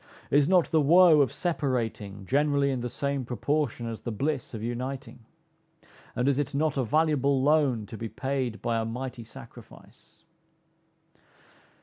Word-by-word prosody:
Is 145 +2 +4
not 180 -3 +3
the 160 - +4
woe 165 +1 +6
of 135 - +2
separating 115 - -3
generally 140 +2 +2
in 130 -2 -2
the 125 - -3
same 140 +2 -2
proportion 125 0 -2
as 115 -1 -5
the 120 - -4
bliss 135 +2 -2
of 110 - -6
uniting? 125 +4 -5 1.0
And 125 +1 0
is 140 0 +2
it 140 -1 -2
not 155 0 +1
a 135 - 0
valuable 140 -1 +2
loan 140 -7 +2
to 105 +1 -9
be 115 - -4
paid 130 -4 -3
by 115 -1 0
a - - -1
mighty 125 +1 -5
sacrifice? 115 - -15
135 Hz, 150 wpm, -27 LUFS, 120-145 Hz, 1.0 s, woe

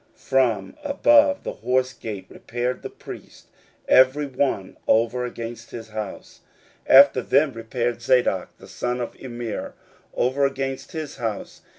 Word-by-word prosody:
16:003:028 - - -30
From 130 - +1
above 290 0 +4
the - - -3
horse 130 0 0
gate 105 -5 -7
repaired 120 +2 -4
the - - -6
priests, - - -11 0.4
every 130 +3 +5
one 130 -8 -2
over 120 +2 +2
against 120 -1 -7
his 115 -2 -8
house. 110 -2 -7 0.5
16:003:029 - - +7
After 140 -2 +2
them 140 +2 +2
repaired 115 +1 -3
Zadok 120 -6 +1
the - - -14
son 125 0 -3
of 120 - -5
Immer 120 -3 -6 0.4
over 135 +3 +2
against 135 +3 -5
his 155 -3 -5
house. 110 -4 -5
125 Hz, 145 wpm, -23 LUFS, 115-135 Hz, 0.5 s, 16:003:029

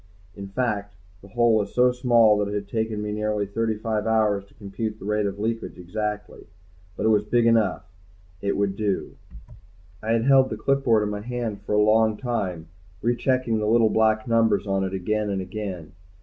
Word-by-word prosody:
In 100 -1 -7
fact 105 -2 -2 0.3
the 100 - -14
hole 120 +2 +2
was 105 -2 0
so 125 0 +5
small 120 -3 +4
that 105 - 0
it - - -3
had 100 -1 -4
taken 110 0 -2
me 105 - -3
nearly 105 -1 -1
thirty 110 +2 -1
five 110 0 -2
hours 105 -3 +2
to - - -26
compute 105 +2 -5
the 100 - -11
rate 105 0 0
of 100 0 -5
leakage 115 +2 -3
exactly. 105 +3 -5 0.5
But - - -2
it - - +4
was 105 -1 +3
big 120 +2 +1
enough, 115 -4 +2 0.6
it 100 0 -1
would 100 -1 0
do. 100 -2 -2 0.9
I 110 +1 0
had 115 0 +1
held 135 -1 +5
the - - -4
clipboard 130 -6 +2
in 105 - -2
my 105 0 -4
hand 115 -3 -4
for 105 - -4
a - - +4
long 110 0 +3
time, 95 -10 -3 0.4
rechecking 120 -1 +1
the 105 - -1
little 115 -1 +4
black 110 +1 +2
numbers 110 -4 +2
on 95 -1 0
it 95 0 -3
again 105 +3 -1
and 100 -1 -1
again. 95 -4 -6
105 Hz, 195 wpm, -24 LUFS, 100-115 Hz, 0.9 s, so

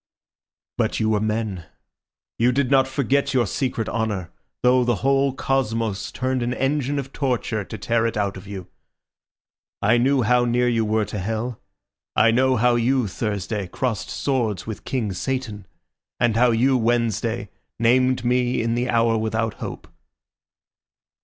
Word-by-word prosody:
"But - - 0
you 110 0 +1
were 105 - +2
men. 105 -5 -2 0.7
You 120 +2 +4
did 135 0 0
not 135 -1 +5
forget 140 0 0
your 120 -2 +3
secret 120 +2 -2
honour, 105 -6 -2 0.3
though 125 0 +5
the 120 -1 +1
whole 135 0 +3
cosmos 115 -6 -1
turned 130 0 -1
an 120 +1 -1
engine 140 +1 0
of 135 -1 -5
torture 125 -5 -1
to 105 +4 -8
tear 115 +3 +1
it 115 - -3
out 100 -1 -1
of 95 +1 -10
you. 95 -3 -7 1.1
I 115 +4 +3
knew 130 +1 +3
how 125 +2 +3
near 120 +1 +2
you 115 -2 +1
were 110 0 +1
to 105 - -5
hell. 110 +4 -3 0.5
I 115 +1 +5
know 130 +2 +3
how 125 +1 +3
you, 120 0 +2
Thursday, 100 -1 -3
crossed 110 0 -3
swords 120 -9 -1
with 110 -2 -7
King 115 -7 -2
Satan, 110 -3 -4 0.5
and 120 -2 +2
how 125 +2 +4
you, 125 +3 +3
Wednesday, 115 -1 0 0.3
named 125 +2 +2
me 125 0 +1
in 115 0 0
the 120 +1 -1
hour 115 -1 +2
without 110 0 -1
hope." - - -6
120 Hz, 155 wpm, -23 LUFS, 110-130 Hz, 1.1 s, not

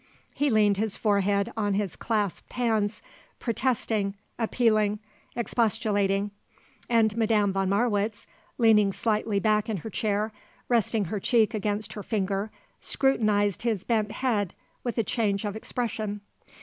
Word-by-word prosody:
He 290 0 +1
leaned 210 -4 +4
his 215 0 -1
forehead 200 -1 +1
on 205 -3 0
his 200 -3 -1
clasped 210 -5 -2
hands, 220 -4 0 0.3
protesting, 225 -4 0 0.2
appealing, 215 -3 +2 0.4
expostulating, 205 -4 +1 0.6
and 225 -3 +3
Madame 215 -3 +2
von 195 -1 0
Marwitz, 210 0 0 0.3
leaning 215 -4 +5
slightly 215 -1 0
back 215 +1 +2
in 215 - -1
her 220 - -5
chair, 210 +2 0 0.4
resting 225 -3 +2
her 205 +4 -3
cheek 225 +2 +3
against 210 0 -1
her 210 - -6
finger, 200 0 -1 0.3
scrutinized 210 -7 +1
his 225 -5 0
bent 215 -2 0
head 215 -7 -1 0.3
with 240 -1 -3
a 230 - +3
change 205 -2 0
of 205 0 -3
expression. 220 -2 -3
215 Hz, 130 wpm, -27 LUFS, 205-225 Hz, 0.6 s, leaning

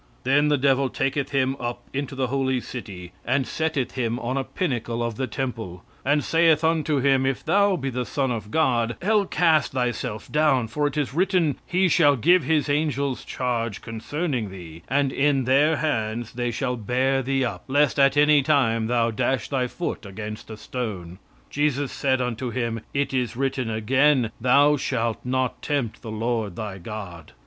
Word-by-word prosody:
"Then 145 +3 +3
the 150 -1 +3
devil 135 0 +2
taketh 135 +2 -1
him 135 -1 +1
up 120 0 -4
into 140 0 -3
the 130 -1 0
holy 130 0 0
city, 95 -8 -8
and 130 +2 +1
setteth 160 -4 -1
him 120 -2 -2
on 125 +1 -3
a 135 - 0
pinnacle 120 -8 -2
of 115 -1 -2
the 130 +4 -3
temple, 110 -8 -5 0.2
"And 145 +2 +2
saith 165 -1 +3
unto 155 -3 +1
him, 135 -1 +3
If 135 -1 -1
thou 200 -1 +3
be 135 -5 -3
the 125 0 -2
Son 135 -3 -1
of 110 -3 -4
God, 120 -5 +1
Hell 210 0 +2
cast 160 -6 +2
thyself 125 -3 -3
down, 145 -7 +2
for 150 +5 0
it 145 - -5
is 145 -3 -1
written, 175 -4 +1
He 185 +1 +2
shall 145 -4 +4
give 175 +9 +4
his 150 -2 +1
angels 145 -2 0
charge 115 -4 -3
concerning 120 - -3
thee; 85 -4 -10
and 140 +1 +1
in 140 -1 +2
their 140 +5 +3
hands 120 -6 -2
they 120 0 -2
shall 125 +1 -2
bear 130 +4 +1
thee 135 0 0
up, 120 - -5
lest 145 +1 +2
at 140 +1 +4
any 150 0 +6
time 115 -6 +2
thou 115 -1 +1
dash 115 +1 -1
thy 130 -3 0
foot 170 -1 -4
against 105 +3 -7
a 110 - -7
stone. 100 -8 -5 0.3
"Jesus 145 -1 0
said 130 -2 0
unto 125 0 -2
him, 115 -2 -2
It 140 0 -1
is 125 -3 -1
written 135 -2 -1
again, 125 +3 +2
Thou 140 +4 +5
shalt 115 -4 -1
not 130 0 -1
tempt 140 -7 -2
the 115 - -8
Lord 110 -3 -2
thy 105 -3 -5
God." 90 -5 -8
130 Hz, 180 wpm, -24 LUFS, 115-145 Hz, 0.3 s, any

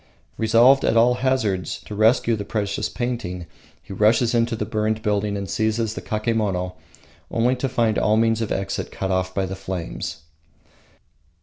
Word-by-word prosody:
Resolved 115 +5 +5
at 115 - +2
all 120 +2 +5
hazards 125 -7 0
to - - -9
rescue 110 +2 +3
the 105 - -4
precious 100 -1 -2
painting, 115 -8 -4 0.4
he - - -9
rushes 110 +4 +3
into 115 0 +1
the 105 - -3
burning 110 0 -1
building 105 -1 0
and 100 -1 -4
seizes 110 +2 0
the - - -6
kakemono, 105 -5 -1 0.6
only 120 +3 +1
to 135 +1 -1
find 115 -3 +1
all 105 +1 +2
means 115 0 +2
of 110 - -3
exit 95 0 -3
cut 95 0 -3
off 95 0 -1
by 95 - +1
the 95 +1 -5
flames. 95 -5 -5
110 Hz, 165 wpm, -22 LUFS, 100-115 Hz, 0.6 s, Resolved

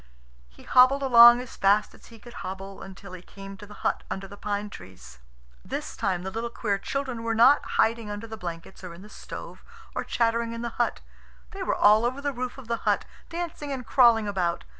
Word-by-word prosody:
He - - -18
hobbled 260 +2 +5
along 240 -1 +8
as 250 - -10
fast 200 +2 +2
as - - -17
he 230 - -14
could 240 +2 -14
hobble, 195 +1 -7
until 195 0 -11
he 185 - -8
came 195 +1 -11
to 205 - -12
the 210 - -13
hut - - +1
under 195 0 -5
the 200 - -11
pine 205 0 -4
trees. 90 - -13 0.4
This - - -5
time 180 -2 -1
the 190 - -5
little 230 +2 -3
queer 205 -4 -2
children 260 +1 -4
were 230 0 -1
not 255 +6 +6
hiding 225 -1 +2
under 205 +2 -5
the 225 -1 -7
blankets 175 -1 -8
or 175 -2 -8
in 180 - -13
the 210 - -13
stove, - - -10 0.3
or - - -2
chattering 230 0 0
in 230 0 -6
the 235 -1 -6
hut. 240 - -1 0.5
They 390 - -8
were 370 - 0
all 210 +2 +5
over 250 +3 -1
the 285 0 -2
roof 255 +1 -5
of 265 -4 -11
the 235 0 -1
hut, - - 0 0.2
dancing 335 -4 -5
and 260 -3 -5
crawling 230 -4 +4
about. 180 -4 -1
225 Hz, 215 wpm, -26 LUFS, 195-245 Hz, 0.5 s, along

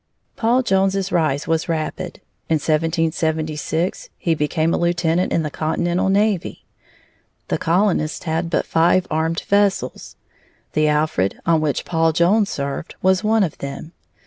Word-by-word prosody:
Paul 240 +3 +2
Jones's 195 -2 +1
rise 155 -4 0
was 165 +1 0
rapid. 165 +2 -3 0.3
In 160 - +3
1776 160 +1 -1
he 165 - 0
became 155 +2 0
a - - +1
lieutenant 175 0 +1
in 165 - +1
the 150 - -4
Continental 175 +5 0
navy. 200 -2 0 0.8
The - - 0
colonists 170 -3 +1
had 165 0 -1
but - - 0
five 175 +3 +3
armed 160 +2 0
vessels; 200 -1 0 0.6
the 155 0 +2
Alfred, 150 -11 0
on 165 -2 +3
which 150 -3 -1
Paul 165 -1 +1
Jones 195 +6 +3
served, 140 +3 -4
was 190 +1 +3
one 220 0 +3
of 165 - -3
them. 140 +3 -6
165 Hz, 140 wpm, -20 LUFS, 155-185 Hz, 0.8 s, In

